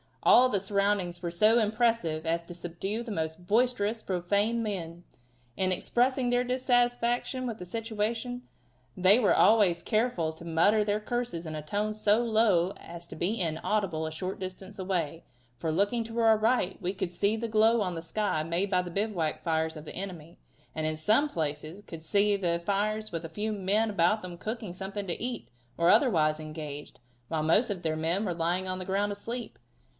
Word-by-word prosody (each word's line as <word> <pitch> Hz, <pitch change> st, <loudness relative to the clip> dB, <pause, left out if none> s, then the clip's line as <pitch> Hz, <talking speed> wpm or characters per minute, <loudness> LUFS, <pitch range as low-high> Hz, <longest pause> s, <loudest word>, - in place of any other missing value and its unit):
All 255 Hz, +1 st, +7 dB
the 205 Hz, -, +1 dB
surroundings 195 Hz, -3 st, 0 dB
were 175 Hz, -, -2 dB
so 215 Hz, +7 st, +4 dB
impressive 215 Hz, -8 st, +1 dB
as 165 Hz, +1 st, 0 dB
to 175 Hz, -, -9 dB
subdue 175 Hz, +5 st, -4 dB
the 235 Hz, -, -7 dB
most 160 Hz, -1 st, -4 dB
boisterously 225 Hz, -1 st, +1 dB
profane 200 Hz, +5 st, 0 dB
men. 175 Hz, -6 st, -4 dB, 0.5 s
In 185 Hz, -1 st, +1 dB
expressing 245 Hz, +7 st, +1 dB
their 245 Hz, 0 st, +2 dB
dissatisfaction 245 Hz, 0 st, +1 dB
with 230 Hz, -2 st, -4 dB
the 180 Hz, -, -8 dB
situation 225 Hz, +4 st, -3 dB, 0.5 s
they 190 Hz, +5 st, +6 dB
were 220 Hz, -, +4 dB
always 195 Hz, -6 st, +4 dB
careful 215 Hz, -8 st, 0 dB
to 165 Hz, +2 st, -12 dB
mutter 185 Hz, +6 st, +3 dB
their 205 Hz, 0 st, 0 dB
curses 235 Hz, -6 st, -3 dB
in 155 Hz, -1 st, -5 dB
a 155 Hz, -, -4 dB
tone 205 Hz, +7 st, -2 dB
so 210 Hz, 0 st, +3 dB
low 215 Hz, -6 st, +3 dB
as 170 Hz, 0 st, -8 dB
to -, -, -9 dB
be 190 Hz, +8 st, -1 dB
inaudible 165 Hz, 0 st, -1 dB
a 160 Hz, -, -4 dB
short 185 Hz, +4 st, -5 dB
distance 190 Hz, +2 st, -8 dB
away, 175 Hz, -4 st, -2 dB, 0.3 s
for, 160 Hz, +6 st, -2 dB
looking 205 Hz, +8 st, +1 dB
to 225 Hz, +1 st, -7 dB
our 225 Hz, -1 st, +5 dB
right, 215 Hz, -4 st, +1 dB
we 180 Hz, +2 st, -1 dB
could 190 Hz, -3 st, -3 dB
see 200 Hz, +4 st, +1 dB
the 230 Hz, +1 st, -3 dB
glow 220 Hz, +1 st, +4 dB
on 185 Hz, -3 st, -1 dB
the 165 Hz, -, -4 dB
sky 170 Hz, -1 st, -1 dB
made 170 Hz, +5 st, -1 dB
by 180 Hz, -1 st, +3 dB
the 175 Hz, -, -7 dB
bivouac 195 Hz, -5 st, -1 dB
fires 160 Hz, -1 st, 0 dB
of 155 Hz, -, -9 dB
the -, -, -9 dB
enemy, 175 Hz, -3 st, -7 dB, 0.4 s
and 155 Hz, -, -2 dB
in 155 Hz, -, -1 dB
some 215 Hz, -, +2 dB
places 155 Hz, -, -4 dB
could 165 Hz, -1 st, -9 dB
see 205 Hz, +4 st, +3 dB
the 170 Hz, -3 st, 0 dB
fires 215 Hz, +3 st, -1 dB
with 165 Hz, -1 st, -4 dB
a -, -, -6 dB
few 215 Hz, +4 st, -3 dB
men 210 Hz, +2 st, +1 dB
about 200 Hz, +3 st, +2 dB
them 175 Hz, -1 st, -7 dB
cooking 215 Hz, 0 st, -5 dB
something 195 Hz, +2 st, -5 dB
to 175 Hz, -, -3 dB
eat, 245 Hz, 0 st, -4 dB, 0.3 s
or 170 Hz, +1 st, +3 dB
otherwise 160 Hz, -, +4 dB
engaged, 155 Hz, -3 st, -7 dB, 0.3 s
while 155 Hz, +1 st, -1 dB
most 210 Hz, +10 st, +3 dB
of 195 Hz, -4 st, -3 dB
their 160 Hz, -1 st, -1 dB
men 170 Hz, +6 st, 0 dB
were 180 Hz, -, -1 dB
lying 175 Hz, +3 st, -1 dB
on 185 Hz, 0 st, -2 dB
the 185 Hz, -, -5 dB
ground 200 Hz, +2 st, 0 dB
asleep. 230 Hz, +4 st, -5 dB
195 Hz, 190 wpm, -29 LUFS, 170-220 Hz, 0.5 s, All